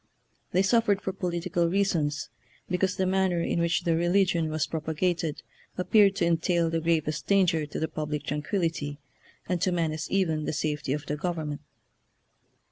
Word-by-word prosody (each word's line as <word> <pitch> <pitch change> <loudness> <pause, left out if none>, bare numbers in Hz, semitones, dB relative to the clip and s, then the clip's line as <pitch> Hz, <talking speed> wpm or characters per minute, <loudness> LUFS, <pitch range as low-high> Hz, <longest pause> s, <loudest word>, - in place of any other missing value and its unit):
They 185 +2 +3
suffered 210 -1 +3
for 190 - -4
political 175 -2 -1
reasons, 170 -6 0 0.4
because 185 +1 0
the 190 - 0
manner 190 -2 +1
in 170 - 0
which 170 +1 +1
their 170 -2 +2
religion 175 -1 +2
was 155 0 0
prop 160 -1 -5
agated 160 -1 -1 0.3
appeared 200 +1 +4
to 170 - +1
entail 170 0 +1
the 165 0 0
gravest 155 -2 0
dan 195 -1 +5
ger 160 -3 0
to - - -5
the 160 - 0
public 150 -2 -4
tranquillity, 150 -1 -2 0.5
and 180 -2 -1
to 185 - +2
men 165 -3 0
ace 155 0 -5
even 160 -6 +1
the - - -2
safety 150 -2 -1
of 150 0 -4
the 150 - -3
government. 155 -3 -3
170 Hz, 170 wpm, -27 LUFS, 155-185 Hz, 0.5 s, dan